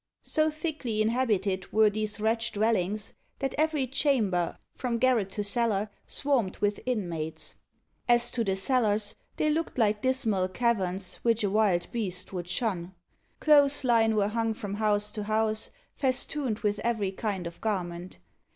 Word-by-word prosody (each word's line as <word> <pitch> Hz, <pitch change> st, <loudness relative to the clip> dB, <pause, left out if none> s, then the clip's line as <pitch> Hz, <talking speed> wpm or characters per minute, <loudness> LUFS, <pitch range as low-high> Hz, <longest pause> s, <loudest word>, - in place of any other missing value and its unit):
So 310 Hz, -1 st, +1 dB
thickly 305 Hz, -8 st, -3 dB
inhabited 215 Hz, -5 st, 0 dB
were 215 Hz, -1 st, +5 dB
these 215 Hz, 0 st, -3 dB
wretched 225 Hz, +2 st, 0 dB
dwellings, 210 Hz, -1 st, 0 dB, 0.2 s
that 270 Hz, -1 st, -2 dB
every 305 Hz, -3 st, +1 dB
chamber, 235 Hz, -, +1 dB, 0.2 s
from 245 Hz, -2 st, -2 dB
garret 235 Hz, -5 st, +2 dB
to 210 Hz, -, -2 dB
cellar, 210 Hz, -1 st, +1 dB, 0.2 s
swarmed 260 Hz, -9 st, 0 dB
with 205 Hz, 0 st, 0 dB
inmates. 170 Hz, -10 st, -2 dB, 0.6 s
As 240 Hz, 0 st, +5 dB
to 235 Hz, -, 0 dB
the 195 Hz, -3 st, 0 dB
cellars, 210 Hz, -1 st, +1 dB, 0.2 s
they 305 Hz, -, +2 dB
looked 320 Hz, -1 st, -2 dB
like 210 Hz, -3 st, +2 dB
dismal 225 Hz, -8 st, +1 dB
caverns, 190 Hz, -3 st, -1 dB
which 230 Hz, -1 st, +1 dB
a 200 Hz, -, +1 dB
wild 195 Hz, -5 st, +2 dB
beast 195 Hz, -6 st, -1 dB
would 175 Hz, -2 st, -4 dB
shun. 185 Hz, -2 st, -2 dB, 0.4 s
Clothes 290 Hz, -2 st, +5 dB
lines 225 Hz, -3 st, +3 dB
were 205 Hz, -1 st, +2 dB
hung 225 Hz, 0 st, -1 dB
from 205 Hz, -2 st, -5 dB
house 210 Hz, 0 st, +1 dB
to 215 Hz, -, -4 dB
house, 215 Hz, 0 st, 0 dB, 0.2 s
festooned 260 Hz, -2 st, -1 dB
with 210 Hz, -1 st, 0 dB
every 220 Hz, -5 st, 0 dB
kind 195 Hz, -2 st, -3 dB
of 170 Hz, 0 st, -8 dB
garment. 180 Hz, -4 st, -3 dB
215 Hz, 150 wpm, -28 LUFS, 195-240 Hz, 0.6 s, were